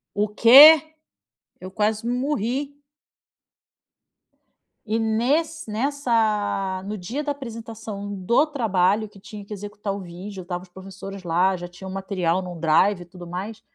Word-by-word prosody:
O 205 +1 +1
quê? 285 +9 +8 0.7
Eu 185 0 -8
quase 215 +2 -1
morri! 260 +2 -2 2.1
E 220 +1 -1
ness 275 +9 0
nessa 215 -6 -1
No 210 +1 -4
dia 240 +12 -4
da 290 - -2
apresentação 225 -6 -7
do 200 - +2
trabalho, 215 - +1
que 205 - -18
tinha 205 +1 -10
que 210 - -8
executar 205 0 -5
o 200 - -6
vídeo, 185 +2 -8
estavam 175 0 -5
os 185 - -17
professores 195 +1 -10
lá, 180 +3 +2
já 175 -1 -7
tinham 190 +2 -10
o - - -7
material 190 -2 -1
num 180 -2 -8
drive, 175 +4 +3
e - - -17
tudo 175 0 -12
mais. 195 +6 -6
205 Hz, 145 wpm, -23 LUFS, 185-230 Hz, 2.1 s, quê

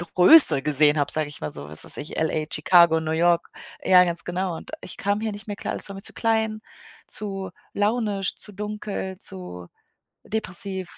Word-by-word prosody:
Größe 180 - +9
gesehen 150 +1 +3
habe, 145 - +2
sage 155 -1 +2
ich 145 - -13
mal 75 - -5
so, 70 0 -6
was 75 - -3
weiß - - -2
ich, 150 - -8
LA, 160 -1 -1
Chicago, 170 +1 +4
New 160 0 -4
York 170 +1 +1 0.3
ja, 180 -1 +6
ganz 170 -1 -1
genau 180 0 -3
und - - -12
ich - - -10
kam 205 +2 -2
hier 220 - -3
nicht 205 +2 -11
mehr 205 - -5
klar, - - -5
alles - - -6
war 195 - -8
mir 195 - -9
zu - - -3
klein, 220 -1 -1 0.5
zu 195 -3 -5 0.2
launisch, 205 -2 -1
zu 210 - -2
dunkel, 210 -2 -6
zu 90 - -9 0.6
depressiv 190 -3 -3
185 Hz, 190 wpm, -23 LUFS, 155-205 Hz, 0.6 s, Größe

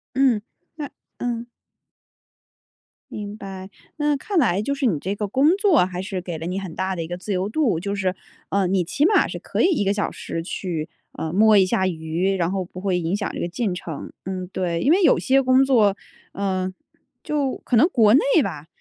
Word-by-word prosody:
嗯， 260 -5 +3 0.3
那 295 -3 -5 0.3
嗯。 240 -1 -3 1.6
明 210 0 -6
白， 190 -1 -8 0.3
那 295 -1 +2
看 380 +7 -3
来 205 - +3
就 280 +6 -1
是 275 - -1
你 185 - +2
这 195 +6 -3
个 210 0 -2
工 280 - +3
作 385 - +4
还 180 -1 -5
是 190 -1 -4
给 175 -2 -5
了 160 - -6
你 180 +3 -2
很 185 -4 -7
大 190 0 -1
的 170 - -3
一 165 - -4
个 175 - -4
自 195 +3 -6
由 185 0 0
度， 220 - +1
就 200 +3 -3
是， 190 -2 0 0.4
呃， 195 -1 +1
你 185 0 +1
起 280 - +1
码 420 - +4
是 - - -6
可 - - -2
以 - - +5
1 205 - 0
个 195 - +2
小 205 - -1
时 165 - -5
去， 170 -4 -4 0.2
呃， 160 - -4
摸 215 +3 +5
一 190 - +6
下 190 0 +1
鱼， 170 +3 -1
然 175 -2 0
后 190 -1 -2
不 180 +1 -10
会 190 -3 0
影 170 +2 -1
响 205 - -2
这 - - -5
个 - - -1
进 195 +2 -2
程。 165 -4 -7
嗯， 185 -1 -4
对， 175 -3 -1
因 275 - +3
为 370 +4 +4
有 330 - +6
些 270 +1 +3
工 260 0 +4
作 225 -7 +4 0.4
呃， 190 -2 -1 0.5
就 285 -3 -1
可 245 - +2
能 290 +10 +6
国 220 - +4
内 265 - +7 0.2
吧， 150 0 -5
195 Hz, 225 characters per minute, -23 LUFS, 180-250 Hz, 1.6 s, 内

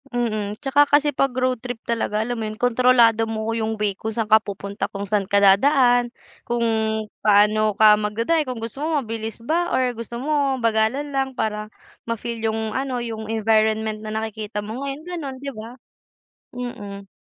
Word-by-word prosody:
Mm, 215 -4 -2
'tsaka 285 +1 +4
kasi 290 0 +3
'pag 275 0 +2
road 255 -1 -1
trip 245 -2 -5
talaga 230 -2 -1
alam 240 +3 -1
mo 225 - -4
'yun, 215 0 -5
kontrolado 240 -2 +4
mo 220 +1 -2
'yung 220 -1 -2
way 205 -2 0
kung 220 +3 -4
saan 220 0 -2
ka 220 0 +5
pupunta, 200 0 -5
kung 200 -1 -5
saan 205 0 +1
ka 200 +1 +2
dadaan, 245 +4 +4 0.3
kung 240 0 -2 0.6
paano 215 +1 +4
ka 215 -1 +8
mag-da-drive, 230 +10 0
kung 255 -4 -5
gusto 230 +5 -6
mo 315 -1 +1
mabilis 225 -3 -5
ba, 330 +9 -1
or 250 -1 +1
gusto 230 +1 -6
mo 280 -1 0
bagalan 230 +5 0
lang 270 0 0
para 215 -3 -3 0.3
ma-feel 230 0 -4
'yung 220 -1 -3
ano, 265 -2 -2
'yung 225 -2 -5
environment 220 0 +1
na 215 - -5
nakikita 220 -1 -4
mo 220 +6 -5
ngayon, 280 - -2
'yung 315 - -15
gano'n 280 -6 -5
'di 280 +1 -5
ba. 215 +1 -8 0.8
Mm. 205 -5 -7
225 Hz, 180 wpm, -22 LUFS, 215-255 Hz, 0.8 s, ka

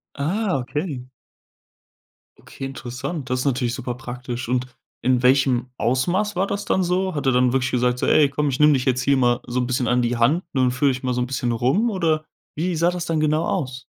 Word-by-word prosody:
Ah, 180 +5 0
okay. 135 +2 -4 1.4
Okay, 135 - -9
interessant. 135 +3 -6
Das 130 0 0
ist 130 - -2
natürlich 125 -3 0
super 120 0 -4
praktisch. 125 0 -6
Und 125 +1 0 0.3
in 125 -1 +1
welchem 130 -1 +3
Ausmaß 175 - 0
war 190 +2 +1
das 200 0 -3
dann 190 - +1
so? 180 0 0
Hat 145 - -3
er 130 - +4
dann 125 0 +3
wirklich 130 0 0
gesagt, 125 0 +1
so: - - 0
„Ey, 145 -2 +4
komm, 145 +1 -1
ich 130 - -3
nehme 150 0 +6
dich 130 -2 0
jetzt 130 -1 +1
hier 140 0 +2
mal 120 -1 +2
so 125 +1 -1
'n 125 - -1
bisschen 125 -1 0
an 125 0 +2
die 120 0 0
Hand, 145 +10 +2
ne, 130 - +1
und 125 -1 +3
führe 135 +2 +2
ich 130 +1 -5
mal 125 -1 0
so 125 - -1
'n 125 - -1
bisschen 125 -2 -1
rum.“, 130 - +1
oder 160 -6 0 0.3
wie 170 +3 -1
sah 170 +2 +2
das 180 -1 -4
dann 160 -2 0
genau 155 +2 +1
aus? 130 -8 -3
130 Hz, 230 wpm, -22 LUFS, 125-155 Hz, 1.4 s, nehme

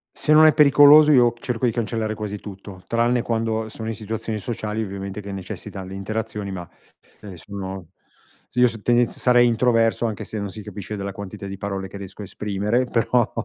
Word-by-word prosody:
Se 155 - +2
non 155 +1 +8
è 155 - +7
pericoloso 150 +1 +7
io 120 -3 +5
cerco 125 0 -2
di 120 - +2
cancellare 110 -2 -2
quasi 105 -1 -5
tutto, 95 -2 -10
tranne 120 +1 +1
quando 110 -1 -2
sono 110 +1 -7
in 115 - -2
situazioni 110 0 -4
sociali 110 0 -3
ovviamente 100 0 -6
che 100 0 -8
necessitano 95 0 -7
le 95 - -8
interazioni, 105 0 -4
ma 90 -2 -7 0.5
se 95 -4 -10
sono 95 -2 -7 0.6
s - - -29
io 125 0 +6
s 115 -2 -4
tendenz 120 0 +2
sarei 120 -1 +4
introverso 115 0 +2
anche 105 - -5
se 110 - -6
non 100 -1 -3
si 105 +3 -8
capisce 105 0 -7
dalla 100 0 -5
quantità 100 0 -8
di 100 - -6
parole 95 -1 -4
che 100 - -13
riesco 95 +1 -9
a - - -6
esprimere, 105 +5 -1
però, 120 0 +1
110 Hz, 195 wpm, -22 LUFS, 100-120 Hz, 0.6 s, non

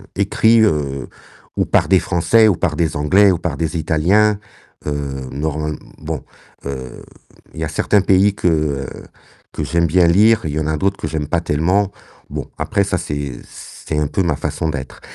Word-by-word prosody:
écrits, 105 +3 +3
heu, 70 -8 0 0.5
ou - - +2
par - - +2
des 95 - +5
Français 95 +7 +3
ou 100 - +3
par 80 -2 -1
des 80 0 0
Anglais 95 +8 +4
ou 90 - 0
par 85 -6 -3
des 80 +1 -2
Italiens, 95 +7 +2 0.5
heu, 70 -3 -3
normal 75 +2 -2
mmh, - - -8 0.2
bon, 80 -3 -5 0.4
heu, 65 -2 -6 0.5
il - - -9
y - - 0
a - - -5
certains 100 +6 +2
pays 95 +1 +3
que, 90 - -1
heu, 75 -5 0 0.7
que - - -3
j'aime 85 +3 +1
bien 85 +2 +4
lire, 110 +6 +5
il 75 - -2
y 75 - -2
en 75 - -2
a 80 0 0
d'autres 95 +5 0
que - - -4
j'aime 75 -2 -3
pas 85 +2 0
tellement, 90 +6 +1 0.4
bon - - -5
après 100 - 0
ça 95 -2 -1
c'est 70 -6 -4
c'est 75 - -7
un 75 - +1
peu 95 - -1
ma 85 -4 +1
façon 80 - -2
d'être, 70 -4 -6
80 Hz, 195 wpm, -18 LUFS, 75-95 Hz, 0.7 s, des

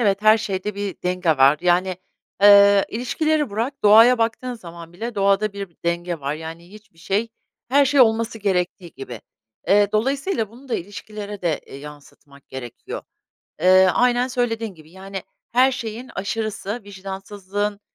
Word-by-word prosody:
Evet, 200 -3 +1
her 215 +1 +6
şeyde 195 0 -3
bir 200 -1 -4
denge 180 -1 0
var, 140 0 +5
yani, 180 +1 +1 0.5
ııı, 200 -1 +7
ilişkileri 295 +5 -1
bırak 235 +7 -3
doğaya 225 +4 +7
baktığın 230 +2 -1
zaman 170 -6 -11
bile 225 +6 -6
doğada 200 +1 +2
bir 200 -1 -6
bi 170 - -33
denge 170 -1 -2
var, 140 +1 -2
yani, 165 +3 -9
hiçbir 210 -5 -17
şey 200 +7 -1 0.4
her 280 +3 +4
şey 275 0 +3
olması 225 -1 +2
gerektiği 180 -4 -2
gibi. 125 -4 -9 0.5
Eee, 205 +1 +5
dolayısıyla 265 - 0
bunu 255 +4 -16
da 245 - -1
ilişkilere 205 +2 -7
de, 165 -4 0
eee, - - -10
yansıtmak 140 -1 -14
gerekiyor. 125 -3 -8 0.6
Eee, 185 +1 +6
aynen 245 0 +2
söylediğin 230 -4 -2
gibi, 155 0 -17
yani, 190 +1 -8 0.3
her 255 +2 +4
şeyin 240 -1 -6
aşırısı, 215 +2 -4
vicdansızlığın, 200 +1 -5
200 Hz, 150 wpm, -22 LUFS, 180-225 Hz, 0.6 s, ııı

